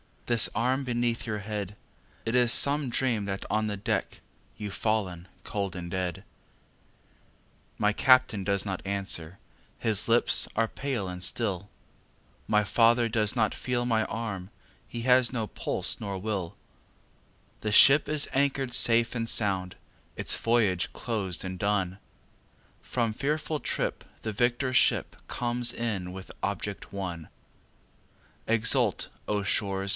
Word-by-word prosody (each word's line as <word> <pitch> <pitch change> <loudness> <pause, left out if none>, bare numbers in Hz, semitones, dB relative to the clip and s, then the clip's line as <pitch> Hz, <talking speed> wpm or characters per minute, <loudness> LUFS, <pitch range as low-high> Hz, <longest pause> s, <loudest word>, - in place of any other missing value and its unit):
This 120 -3 +3
arm 130 +5 +1
beneath 120 -1 -1
your 105 -1 -2
head! 105 -1 -5 0.5
It 115 - -1
is 125 -2 +4
some 145 -1 +4
dream 120 -4 0
that 95 -1 -4
on 110 0 +1
the 105 -1 -3
deck 100 - -2 0.4
You've 105 -2 -5
fallen 95 -6 -1 0.2
cold 100 -3 -3
and 85 -1 -6
dead. 90 -2 -3 1.5
My 105 0 +2
Captain 130 -5 +4
does 100 0 +1
not 95 -2 -3
answer, 95 -3 -3 0.4
his 105 -2 0
lips 115 +1 +3
are 115 0 +1
pale 130 -8 -3
and 90 0 -7
still, 100 -2 -1 0.8
My 105 -1 +3
father 115 +2 +3
does 110 0 +1
not 110 -3 +2
feel 120 -1 -2
my 115 -2 +1
arm, 100 -4 -5 0.4
he 120 - -6
has 125 +1 +4
no 115 -3 -1
pulse - - -2
nor 100 -2 -4
will; 95 -3 -3 1.0
The 105 -1 -2
ship 140 +6 +8
is 150 -1 +1
anchor'd 135 -2 0
safe 115 0 +4
and 115 -2 -2
sound, 95 -4 +1 0.4
its - - 0
voyage 110 -6 +1
closed 100 -7 -3
and 95 -1 -5
done, 95 -2 0 0.8
From 115 -3 -1
fearful 150 +4 -1
trip - - -2 0.2
the 110 - -3
victor 120 +4 0
ship 120 - +3
comes 120 0 0
in 105 -6 -3
with 95 0 -9
object 100 0 -4
won; 90 -5 -5 1.2
Exult, 115 -1 +3 0.2
O 105 -1 0
shores! 100 0 -1
110 Hz, 135 wpm, -28 LUFS, 100-120 Hz, 1.5 s, ship